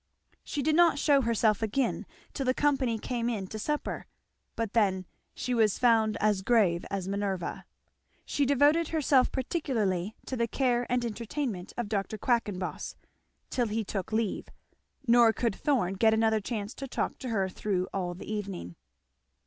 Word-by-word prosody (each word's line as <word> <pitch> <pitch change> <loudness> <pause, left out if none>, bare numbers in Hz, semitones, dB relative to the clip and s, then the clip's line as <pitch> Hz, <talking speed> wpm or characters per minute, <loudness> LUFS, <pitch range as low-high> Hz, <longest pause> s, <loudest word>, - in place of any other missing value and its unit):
She 285 - -3
did 305 +2 +2
not 340 -2 +5
shew 285 -1 +4
herself 225 -3 +2
again 230 +4 -1 0.3
till 270 -3 -3
the 255 - +3
company 270 -6 +1
came 235 +1 -2
in 210 -5 -2
to 215 +3 -7
supper; 300 +7 -3 0.5
but 225 -3 -3
then 190 -5 +2 0.3
she 250 - -2
was 220 -4 +3
found 225 -3 +3
as 210 -2 +2
grave 190 -6 +3
as 195 -2 -3
Minerva. 195 -3 -3 0.6
She 290 - 0
devoted 290 +4 +4
herself 290 -5 +3
particularly 220 - -1
to 260 - -4
the 235 -1 0
care 245 0 +1
and 245 -1 +1
entertainment 230 -3 -4
of 240 -3 -2
Dr. 205 +1 -2
Quackenboss 205 -6 -1 0.6
till 245 -2 +1
he 220 +1 -1
took 195 -1 -4
leave; 220 -2 -1 0.6
nor 235 -2 +6
could 230 0 -1
Thorn 240 -11 +1
get 220 +3 +4
another 220 0 +3
chance 210 0 -4
to 275 - -7
talk - - -2
to 255 - -5
her 195 -4 +1
through 185 -1 -2
all 180 -2 -2
the 180 - -9
evening. 195 - -5
225 Hz, 160 wpm, -29 LUFS, 200-255 Hz, 0.6 s, nor